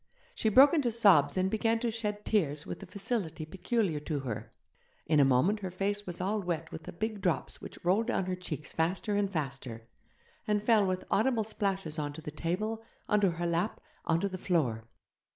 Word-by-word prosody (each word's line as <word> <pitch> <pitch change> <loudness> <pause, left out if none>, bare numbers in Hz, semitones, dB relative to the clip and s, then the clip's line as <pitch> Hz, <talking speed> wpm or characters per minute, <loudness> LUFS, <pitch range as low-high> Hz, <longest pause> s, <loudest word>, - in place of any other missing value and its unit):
She 225 - +1
broke 270 +8 +7
into 280 -8 +2
sobs 200 -9 +5
and 185 0 +2
began 225 +1 +2
to 235 - 0
shed 210 -2 -3
tears 155 -8 +1
with - - -6
the 195 - -10
facility 190 -5 -2
peculiar 190 0 -1
to 150 -1 -3
her. 120 -5 -5 0.5
In 155 -1 +3
a - - +7
moment 135 +11 +3
her 190 -2 -4
face 200 +3 -2
was 175 - -5
all 200 +3 0
wet 170 -3 -3
with 160 - -8
the - - -6
big 215 +3 -3
drops 180 -4 -1
which - - -9
rolled 200 +6 +3
down 195 -6 0
her 185 0 -2
cheeks 160 -5 -6
faster 185 +6 0
and 200 -1 +1
faster, 130 - -4 0.6
and 210 -1 +1
fell 215 -3 +4
with 185 0 -2
audible 225 +1 +2
splashes 195 -7 -2
on 145 -1 -3
to 160 - -9
the 150 - -6
table, 195 +9 -2 0.3
on 210 0 +3
to 195 - +4
her 175 0 -3
lap, 170 +5 0 0.2
on 165 0 +2
to 200 - +1
the 185 -1 -6
floor. 125 - 0
185 Hz, 205 wpm, -31 LUFS, 160-210 Hz, 0.6 s, broke